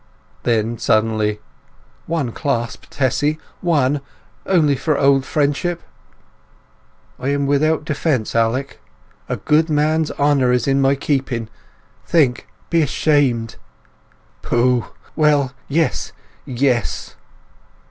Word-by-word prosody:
Then, 115 -1 0
suddenly: 110 -1 +1 0.7
"One 155 -7 -1
clasp, 120 -4 -3
Tessy—one! 145 +1 0 0.5
Only 155 -7 +3
for 145 +2 0
old 135 -1 +3
friendship—" 155 +5 -1 1.4
"I 130 - -4
am 140 0 0
without 150 +2 +1
defence. 145 -6 -1
Alec! 115 +4 0 0.5
A - - 0
good 155 +2 +2
man's 155 +1 +1
honour 140 -3 +2
is 125 0 +1
in 135 0 +2
my 135 +1 +3
keeping—think—be 135 +4 -2
ashamed!" 140 -6 +1 0.8
"Pooh! 120 0 +1 0.3
Well, 150 -4 +3 0.2
yes—yes!" 135 -5 -2
140 Hz, 85 wpm, -19 LUFS, 125-150 Hz, 1.4 s, Only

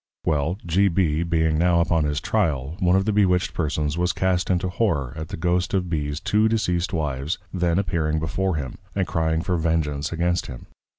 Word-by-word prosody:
Well, 80 +4 0
G. 95 +4 +3
B. 85 -4 +1
being 80 -2 +1
now 85 0 +3
upon 85 -2 +2
his 75 0 0
Tryal, 75 -9 -1
one 90 0 +3
of 95 0 +2
the 110 - +1
Bewitched 90 -3 +2
Persons 75 0 -1
was 90 +1 +1
cast 95 -1 0
into 95 0 +1
Horror 85 - 0
at 80 0 -5
the - - -6
Ghost 90 +3 0
of 90 -2 -1
B's 75 -2 -2
two 105 +6 +2
Deceased 90 -6 0
Wives 75 0 -2 0.2
then 90 -2 +1
appearing 80 -5 0
before 85 +4 -1
him, 70 -5 -5 0.2
and 95 -2 +1
crying 80 -1 0
for 90 -2 0
Vengeance 80 -3 -1
against 85 +1 0
him. 60 - -9
85 Hz, 190 wpm, -23 LUFS, 75-90 Hz, 0.2 s, G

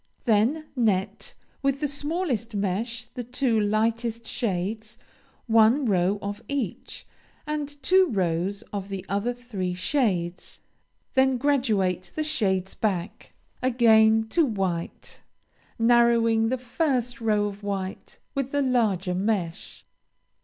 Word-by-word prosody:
Then 240 +8 +2
net 210 -7 -1 0.3
with 275 -1 +1
the 295 - 0
smallest 285 - -2
mesh 220 +4 -2
the 245 - -7
two 245 -1 0
lightest 225 +2 0
shades, 215 +1 -3 0.5
one 230 +4 +4
row 190 -2 +2
of 205 +2 -4
each, 270 -10 -4 0.4
and 300 -1 -2 0.2
two 375 0 +5
rows 185 -1 -1
of 200 -1 -4
the 195 -1 -5
other 205 +5 0
three 215 -8 -4
shades. 185 -6 -1 0.5
Then 265 -1 +3
graduate 220 -10 +1
the 310 - 0
shades 190 -11 0
back 200 0 -3 0.3
again 220 -3 +4
to 335 - +3
white, 190 - -3 0.6
narrowing 230 -1 +4
the 260 - 0
first 250 -2 -1
row 210 -2 +2
of 205 0 -5
white 195 -2 -5 0.2
with 275 -2 -2
the 285 -1 +1
larger 210 -8 +1
mesh. 185 -3 -2
225 Hz, 115 wpm, -25 LUFS, 195-250 Hz, 0.6 s, two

